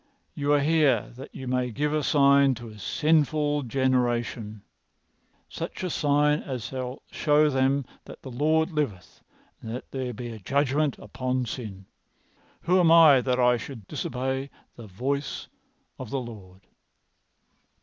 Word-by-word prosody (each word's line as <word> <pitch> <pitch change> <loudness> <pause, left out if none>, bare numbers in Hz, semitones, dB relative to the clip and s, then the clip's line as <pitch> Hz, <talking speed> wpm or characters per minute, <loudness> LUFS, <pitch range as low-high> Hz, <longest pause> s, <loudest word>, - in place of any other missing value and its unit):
'You 145 -1 -1
are 145 - +4
here 150 -1 +2
that 135 +3 -9
you 130 - -7
may 125 0 0
give 145 +6 -1
a 155 - +1
sign 140 -2 +4
to 120 0 -9
a 105 -1 -13
sinful 150 +3 +1
generation—such 120 - -4
a 180 - -2
sign 150 0 +2
as 130 -4 -5
shall 130 +1 -6
show 150 -1 +3
them 135 +1 +1 0.2
that - - -12
the 130 - -8
Lord 155 +6 +1
liveth 125 - -4 0.4
and 110 - -8
that 120 +3 -7
there 130 -2 -3
is 120 -1 -6
a 110 - -9
judgment 140 +6 0
upon 130 -1 -3
sin.' 105 -5 -7 0.8
Who 180 +2 +3
am 170 -2 +4
I 160 -6 +8
that 125 0 0
I 125 -1 +4
should 115 -3 -9
disobey 130 +2 -3 0.3
the 115 -2 -11
voice 135 +9 -3 0.5
of 130 -4 -7
the 135 - -2
Lord?" 100 -6 -10
130 Hz, 145 wpm, -26 LUFS, 120-145 Hz, 0.8 s, I